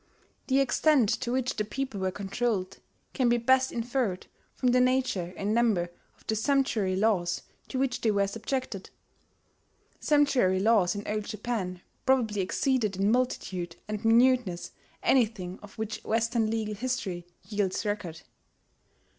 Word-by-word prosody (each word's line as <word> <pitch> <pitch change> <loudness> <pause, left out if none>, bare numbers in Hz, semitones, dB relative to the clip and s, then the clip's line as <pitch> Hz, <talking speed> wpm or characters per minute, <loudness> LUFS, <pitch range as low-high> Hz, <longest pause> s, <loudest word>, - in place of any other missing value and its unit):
The 265 0 +3
extent 275 -3 +3
to 240 -2 -2
which 255 0 -1
the 210 - +1
people 260 0 -4
were 190 0 0
controlled 195 0 -2 0.3
can 255 -3 +2
be 240 - +4
best 260 +2 +3
inferred 235 -5 -2 0.3
from 250 - +1
the 250 0 +4
nature 255 -9 +1
and 205 +2 -1
number 215 -7 +2 0.3
of - - -25
the 220 - 0
sumptuary 220 -6 +1
laws 185 -4 +1 0.2
to 265 - -4
which 260 -1 0
they 225 - +2
were 200 -1 +2
subjected. 220 0 -4 1.1
Sumptuary 270 -11 +3
laws 205 -3 +3
in 205 - -5
Old 210 0 -2
Japan 210 -5 -4 0.2
probably 230 -6 +2
exceeded 215 +1 0
in 200 +2 +2
multitude 190 -9 -1
and 210 +1 -4
minuteness 230 -5 +3 0.3
anything 215 -8 +1
of 205 -2 -13
which 220 -1 -4
Western 225 0 +1
legal 220 -1 -2
history 200 -7 -3 0.2
yields 205 -1 -1
record. 195 -6 -3
220 Hz, 140 wpm, -28 LUFS, 195-250 Hz, 1.1 s, be